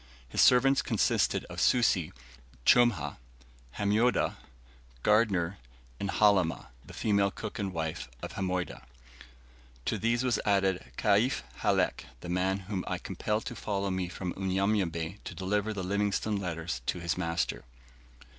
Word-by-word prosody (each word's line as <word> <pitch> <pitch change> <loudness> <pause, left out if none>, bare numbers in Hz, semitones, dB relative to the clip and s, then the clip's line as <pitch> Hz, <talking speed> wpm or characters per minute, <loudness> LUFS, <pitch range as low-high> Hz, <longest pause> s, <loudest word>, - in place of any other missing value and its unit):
His - - +1
servants 135 +2 +6
consisted - - +1
of - - -5
Susi, 95 -10 +3 0.5
Chumah, 120 - +4 0.6
Hamoydah, 105 +5 +2 0.7
Gardner, 100 -4 +2 0.4
and 100 - -2
Halimah, 100 -6 +2
the - - -12
female 100 -2 +2
cook 105 +2 -7
and 100 -2 -2
wife 80 -6 -4
of - - -5
Hamoydah; 90 -1 -2 1.0
to - - -1
these 115 +2 +1
was 125 -2 +1
added 95 -2 +2
Kaif 105 +6 +2 0.2
Halek, - - +1 0.2
the 90 - -7
man 95 +2 0
whom 95 -1 -4
I - - -1
compelled 105 +1 -3
to 120 - -5
follow 100 -3 -2
me 95 -1 -1
from 90 0 -4
Unyanyembe 95 -2 -1
to - - -7
deliver 105 +3 -1
the 100 -3 -4
Livingstone 100 +2 0
letters 85 -7 -3
to 90 - -1
his 85 -1 -1
master. 85 -1 -2
100 Hz, 135 wpm, -30 LUFS, 90-105 Hz, 1.0 s, servants